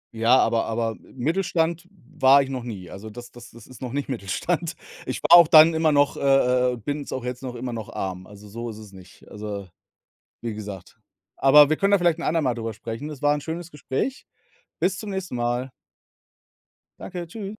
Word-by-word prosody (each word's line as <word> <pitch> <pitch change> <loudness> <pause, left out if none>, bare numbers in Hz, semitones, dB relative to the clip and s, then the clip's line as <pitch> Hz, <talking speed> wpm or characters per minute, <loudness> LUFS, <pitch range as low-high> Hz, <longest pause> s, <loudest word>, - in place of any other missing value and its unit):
Ja, 115 +3 +4
aber 115 - +2
aber 115 0 -2
Mittelstand 165 +4 -2
war 140 -5 +3
ich 135 - -8
noch 130 -2 -4
nie. 100 -7 -8
Also, 110 +3 -9
das 120 +2 -11
das 120 0 -13
das 120 - -15
ist 130 -2 -15
noch 125 0 -5
nicht 140 -1 -3
Mittelstand. 160 - -2 0.3
Ich - - -4
war - - -1
auch 170 -2 +9
dann 160 +1 +8
immer 160 -1 +2
noch, 145 -1 +2
äh - - -6
äh 125 -2 +3
äh, - - -6
bin's 145 +5 -5
auch 130 - -4
jetzt 125 0 -5
noch 125 -2 -6
immer 120 0 -5
noch, 110 -3 -6
arm. 95 -1 -5
Also, 105 0 -14
so 115 +3 -6
ist 110 - -8
es 105 -2 -12
nicht, 95 -1 -16
also, 105 -2 -7 0.8
wie 115 - -3
gesagt. 105 -4 -9 0.4
Aber 145 +2 +7
wir 155 - +1
können 200 +1 +2
da 200 - +6
vielleicht 175 -2 +2
'n 170 - -6
andermal 150 -7 +1
drüber 115 -1 -5
sprechen. 115 +6 -6
Das 150 -3 -9
war 145 0 +4
'n 150 - -3
schönes 165 +3 -6
Gespräch. 150 - -4 0.5
Bis 185 +1 +1
zum 210 -2 -6
nächsten 190 -8 -4
Mal. 120 +2 -1 1.3
Danke, 175 -2 -6
Tschü 200 +2 -7
130 Hz, 205 wpm, -24 LUFS, 115-160 Hz, 1.3 s, auch